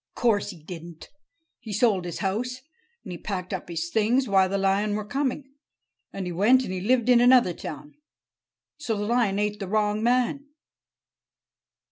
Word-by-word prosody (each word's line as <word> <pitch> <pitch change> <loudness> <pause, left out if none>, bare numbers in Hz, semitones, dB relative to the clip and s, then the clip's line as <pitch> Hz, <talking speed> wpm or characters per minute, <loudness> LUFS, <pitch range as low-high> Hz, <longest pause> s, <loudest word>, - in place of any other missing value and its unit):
"Course 215 -4 +1
he 175 -6 -10
didn't. 170 0 -10 0.5
He 220 - -9
sold 205 -3 +2
his 175 - -5
house, 250 +6 -2 0.4
and - - -8
he 175 - -7
packed 185 -2 -5
up 185 - -5
his 170 0 -4
things, 235 +4 +2
while 190 -2 +3
the 200 - -1
lion 195 +2 +1
were 210 -1 -3
coming. 275 +3 -3 0.6
And 195 -1 -5
he 180 - -4
went 225 +9 +4
and 185 - -5
he 185 - -4
lived 240 +3 +2
in 245 -1 +6
another 245 -7 +5
town. 150 -2 -8 0.8
So 245 -8 -3
the 205 - -2
lion 230 -3 +1
ate 210 0 -1
the 195 - -5
wrong 210 +1 0
man." 250 +4 +1
210 Hz, 170 wpm, -25 LUFS, 185-245 Hz, 0.8 s, in